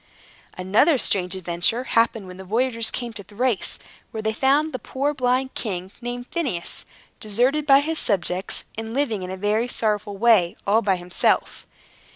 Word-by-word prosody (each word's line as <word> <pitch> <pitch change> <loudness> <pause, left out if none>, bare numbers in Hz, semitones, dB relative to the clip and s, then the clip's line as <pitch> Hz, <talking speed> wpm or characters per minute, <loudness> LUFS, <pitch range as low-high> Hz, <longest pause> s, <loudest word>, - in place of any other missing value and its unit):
Another 205 - +3
strange 185 -5 0
adventure 180 +6 0
happened 230 -4 +1
when 180 0 -10
the 190 - -8
voyagers 230 +3 +1
came 240 -2 -4
to 205 -3 -9
Thrace, 215 +3 -1 0.3
where 220 -2 -6
they 220 0 0
found 285 +6 +2
a 255 - -3
poor 280 +3 -2
blind 255 0 0
king, 190 -4 -4
named 245 0 -5
Phineus, 260 - -3 0.3
deserted 250 +8 +1
by 275 0 +7
his 320 +2 -2
subjects, 190 -2 -1
and 225 +1 -5
living 245 -8 0
in 180 - -5
a 190 - -5
very 210 +4 0
sorrowful 210 -4 -1
way, 210 -6 +4
all 215 +3 +3
by 195 -3 +2
himself. 175 0 0
225 Hz, 165 wpm, -23 LUFS, 190-255 Hz, 0.3 s, by